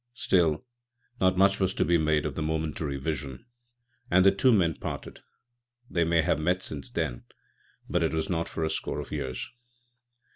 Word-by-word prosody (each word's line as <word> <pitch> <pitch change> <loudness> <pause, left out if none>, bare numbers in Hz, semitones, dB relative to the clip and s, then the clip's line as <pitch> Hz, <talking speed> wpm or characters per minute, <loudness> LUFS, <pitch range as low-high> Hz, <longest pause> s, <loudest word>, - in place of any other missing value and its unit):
Still, 85 -4 +2 0.5
not 95 0 +3
much 100 +1 +4
was 95 0 +1
to - - +2
be 85 -1 +3
made 75 -1 +2
of 75 - -2
the 80 - -4
momentary 80 -2 -2
vision, 70 - -4 0.6
and 95 +1 +5
the 100 - +8
two 115 +7 +3
men 90 -7 +3
parted. - - -6 0.7
They 85 - +2
may 85 -1 +3
have 75 - +1
met 90 +4 +1
since 130 - -4
then, 80 - -3 0.6
but 90 - 0
it 80 - +1
was 80 +2 -1
not 85 -4 -1
for 80 - -3
a 80 - 0
score - - -3
of - - -7
years. 65 -4 -4
80 Hz, 180 wpm, -28 LUFS, 75-95 Hz, 0.7 s, the